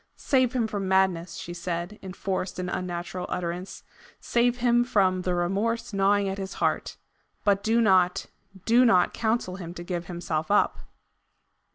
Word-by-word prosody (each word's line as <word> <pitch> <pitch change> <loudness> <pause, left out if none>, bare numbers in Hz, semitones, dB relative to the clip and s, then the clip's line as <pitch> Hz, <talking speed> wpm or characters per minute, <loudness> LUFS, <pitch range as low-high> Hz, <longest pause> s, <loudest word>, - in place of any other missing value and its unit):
"Save 260 -4 +1
him 245 -3 +1
from 205 -3 -3
madness," 190 -2 +1
she 175 - -7
said, 175 +3 -4
in 190 -1 -7
forced 190 -1 -3
and 180 0 -3
unnatural 180 0 -4
utterance. 180 +2 -4 0.4
"Save 240 +1 +1
him 240 -1 +3
from 195 -7 +2
the 180 0 -1
remorse 200 +7 -1
gnawing 200 +1 +2
at 195 +1 -3
his 190 0 -5
heart. - - -1 0.5
But 200 -2 +3
do 225 +2 +2
not, 185 -5 +3 0.4
DO 235 +2 +5
not 185 -7 +4
counsel 220 -5 -1
him 175 -2 -8
to 175 - -7
give 175 -1 -4
himself 170 -3 -3
up." 205 - +2
190 Hz, 160 wpm, -26 LUFS, 180-220 Hz, 0.5 s, DO